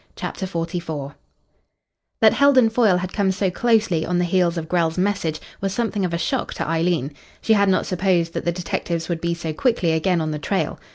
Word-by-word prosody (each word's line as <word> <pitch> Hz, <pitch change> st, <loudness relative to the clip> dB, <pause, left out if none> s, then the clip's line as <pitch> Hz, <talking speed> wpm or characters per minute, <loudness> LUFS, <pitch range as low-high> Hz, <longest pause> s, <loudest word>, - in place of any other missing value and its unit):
CHAPTER 190 Hz, -, -5 dB
XLIV 165 Hz, -5 st, -4 dB, 1.1 s
That 220 Hz, -1 st, +6 dB
Heldon 265 Hz, -5 st, +4 dB
Foyle 220 Hz, -6 st, +3 dB
had 185 Hz, 0 st, -4 dB
come 200 Hz, -2 st, +1 dB
so 190 Hz, 0 st, -1 dB
closely 215 Hz, -6 st, +2 dB
on 180 Hz, +1 st, -1 dB
the 175 Hz, -, +2 dB
heels 175 Hz, -1 st, +1 dB
of 160 Hz, -1 st, -4 dB
Grell's 165 Hz, -1 st, 0 dB
message 180 Hz, -5 st, 0 dB, 0.2 s
was 195 Hz, 0 st, -2 dB
something 225 Hz, -3 st, -1 dB
of 180 Hz, -, -1 dB
a 170 Hz, -, -1 dB
shock -, -, -2 dB
to -, -, -3 dB
Eileen. 165 Hz, -3 st, 0 dB, 0.3 s
She 220 Hz, -, +4 dB
had 200 Hz, -2 st, +3 dB
not 185 Hz, -, +2 dB
supposed 180 Hz, -3 st, 0 dB
that -, -, -3 dB
the 170 Hz, -, +1 dB
detectives 170 Hz, -1 st, -3 dB
would 170 Hz, -2 st, -2 dB
be 170 Hz, 0 st, -1 dB
so 165 Hz, -2 st, -4 dB
quickly 190 Hz, -, +1 dB
again 170 Hz, +2 st, +1 dB
on 155 Hz, -1 st, -2 dB
the 150 Hz, -, -3 dB
trail. 190 Hz, +5 st, -2 dB
180 Hz, 205 wpm, -22 LUFS, 165-195 Hz, 1.1 s, That